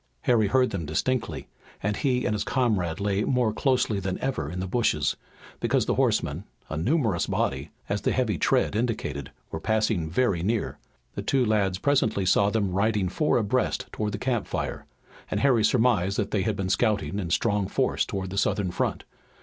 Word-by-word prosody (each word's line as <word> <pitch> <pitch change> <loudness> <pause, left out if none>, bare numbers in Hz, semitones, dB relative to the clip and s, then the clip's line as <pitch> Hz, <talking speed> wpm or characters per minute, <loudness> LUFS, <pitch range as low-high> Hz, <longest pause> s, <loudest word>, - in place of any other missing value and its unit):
Harry 110 -4 +3
heard 125 +4 +2
them 95 -4 -3
distinctly 115 +11 -2 0.4
and 105 +1 0
he 125 -3 +1
and - - +1
his 105 - -1
comrade 105 -11 0
lay 100 0 0
more 125 -4 +1
closely 125 -4 +1
than 95 -1 -3
ever 130 - -2
in 90 +3 -5
the 95 - -2
bushes, 90 - +1 0.4
because - - +1
the - - +1
horsemen, - - +1 0.3
a - - -3
numerous 110 - +1
body, - - -1 0.2
as 100 0 -1
the - - +1
heavy 110 - 0
tread - - +2
indicated, 105 - -2 0.2
were 80 - -4
passing 110 -4 0
very 95 -1 +1
near. 110 +5 -1 0.3
The - - -4
two 135 -2 +1
lads 100 -4 +1
presently 110 -5 +1
saw 100 +2 +4
them 105 -3 0
riding 100 0 +1
four 150 - +1
abreast 120 +3 0
toward 105 -1 -3
the - - -2
campfire, 120 -4 -2 0.4
and - - -1
Harry 125 -5 +4
surmised 105 -5 +2
that - - -1
they 105 - +1
had 105 +2 0
been 95 -1 -2
scouting 100 -5 +1
in 90 -4 -3
strong 100 +2 +1
force - - +1
toward 95 -2 -4
the 100 - 0
Southern 95 -3 0
front. - - -2
105 Hz, 180 wpm, -26 LUFS, 95-120 Hz, 0.4 s, saw